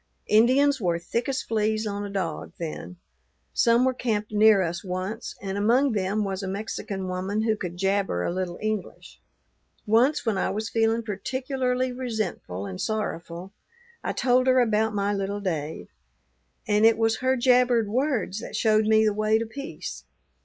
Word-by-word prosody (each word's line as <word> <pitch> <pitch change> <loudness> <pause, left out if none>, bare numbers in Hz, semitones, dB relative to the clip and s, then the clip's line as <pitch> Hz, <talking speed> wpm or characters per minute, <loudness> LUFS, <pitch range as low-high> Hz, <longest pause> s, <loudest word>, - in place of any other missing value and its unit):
"Indians 260 +5 +4
were 175 -3 +1
thick 230 +9 -3
as 270 +1 -1
fleas 215 0 0
on 205 -1 -3
a 205 - -5
dog 185 -6 -4
then; 170 +2 -6 0.6
some 235 +1 +4
were 260 - +2
camped 215 -4 -2
near 210 -2 +5
us 170 0 -3
once, 190 +5 -4
and 195 0 -3
among 250 +6 +3
them 205 0 0
was 195 -1 -3
a 195 - -4
Mexican 195 -1 -4
woman 190 +4 -2
who 220 -1 +2
could 180 -4 -6
jabber 195 - 0
a - - -1
little 180 -1 -3
English. 215 -3 -4 0.6
Once, 240 +5 +3
when 215 -4 0
I - - 0
was 215 +1 -3
feeling 225 +1 +1
particularly 255 +4 -2
resentful 220 - -4
and 95 -2 -6
sorrowful, 185 -3 -4 0.5
I - - -1
told 255 0 +2
her 255 0 +5
about 220 -2 +2
my 200 0 0
little 200 +1 -2
Dave; 155 - -4 0.8
and 210 +1 +2
it 225 0 +6
was 225 0 +2
her 260 +1 +1
jabbered 245 -2 +3
words 230 -4 -1
that - - -7
showed 215 -1 +3
me 220 0 +5
the 210 - +2
way 215 +1 +2
to 225 - -2
peace. 275 +6 -7
215 Hz, 165 wpm, -25 LUFS, 195-235 Hz, 0.8 s, it